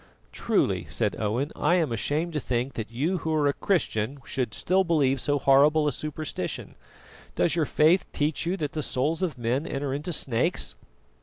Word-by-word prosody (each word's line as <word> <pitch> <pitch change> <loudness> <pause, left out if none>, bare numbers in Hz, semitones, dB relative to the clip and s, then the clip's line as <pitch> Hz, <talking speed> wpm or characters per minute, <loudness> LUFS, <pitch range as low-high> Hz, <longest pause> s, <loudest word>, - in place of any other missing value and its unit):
"Truly," - - 0
said - - -1
Owen, 115 +7 -1
"I 175 - +2
am 165 -7 +1
ashamed 150 +9 -1
to 150 - 0
think 125 0 -2
that 115 -2 -5
you 155 +11 -1
who 160 - -3
are 150 -1 +2
a 140 - +3
Christian 135 - 0
should 125 -6 -2
still 190 +2 +2
believe 140 -7 +2
so 145 -1 +1
horrible 145 +3 +4
a - - +2
superstition. 155 +3 -5 0.6
Does 165 - +2
your 165 -3 +2
faith 160 +5 +3
teach 150 +1 -1
you 185 +3 0
that 150 -5 -3
the 155 - -3
souls 150 +5 0
of 175 -8 -1
men 125 +6 -1
enter 135 -1 -3
into 150 +5 -3
snakes?" 125 -7 0
145 Hz, 180 wpm, -26 LUFS, 130-160 Hz, 0.6 s, horrible